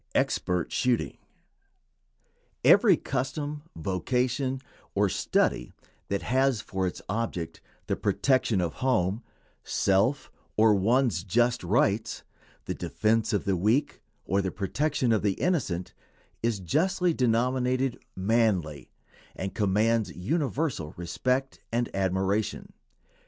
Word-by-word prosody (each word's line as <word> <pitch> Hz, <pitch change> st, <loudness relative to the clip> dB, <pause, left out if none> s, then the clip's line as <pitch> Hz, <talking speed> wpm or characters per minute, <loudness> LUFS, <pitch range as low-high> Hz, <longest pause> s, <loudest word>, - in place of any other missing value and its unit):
EXPERT 90 Hz, -2 st, 0 dB
SHOOTING. 125 Hz, -2 st, 0 dB, 1.4 s
Every -, -, +6 dB
custom, 145 Hz, +3 st, -3 dB
vocation, 125 Hz, -, -1 dB, 0.4 s
or -, -, +3 dB
study -, -, 0 dB, 0.3 s
that 100 Hz, 0 st, -2 dB
has 130 Hz, -1 st, +2 dB
for 95 Hz, -3 st, -2 dB
its 90 Hz, -, -6 dB
object 90 Hz, -6 st, -3 dB, 0.2 s
the -, -, -1 dB
protection 130 Hz, -7 st, +1 dB
of 85 Hz, -2 st, -1 dB
home, 110 Hz, -5 st, +1 dB, 0.4 s
self, 100 Hz, +9 st, +1 dB, 0.3 s
or 110 Hz, 0 st, +6 dB
one's 105 Hz, -2 st, +2 dB
just 120 Hz, +4 st, +1 dB
rights, 105 Hz, +2 st, +1 dB, 0.4 s
the -, -, -2 dB
defense 110 Hz, 0 st, 0 dB
of 105 Hz, -, 0 dB
the 100 Hz, -2 st, +1 dB
weak 110 Hz, +11 st, +1 dB, 0.2 s
or 100 Hz, +2 st, +1 dB
the 95 Hz, -, -1 dB
protection 125 Hz, -, -1 dB
of 110 Hz, -, +3 dB
the 100 Hz, -2 st, +1 dB
innocent, 105 Hz, -, -1 dB, 0.5 s
is 115 Hz, -3 st, 0 dB
justly 175 Hz, -, +1 dB
denominated 125 Hz, +1 st, +1 dB
"manly," 95 Hz, -, 0 dB, 0.5 s
and 95 Hz, 0 st, -4 dB
commands 110 Hz, +2 st, +1 dB
universal 135 Hz, -, -2 dB
respect 125 Hz, +10 st, -1 dB
and 120 Hz, -2 st, -1 dB
admiration. 95 Hz, +2 st, -1 dB
110 Hz, 110 wpm, -27 LUFS, 95-130 Hz, 1.4 s, Every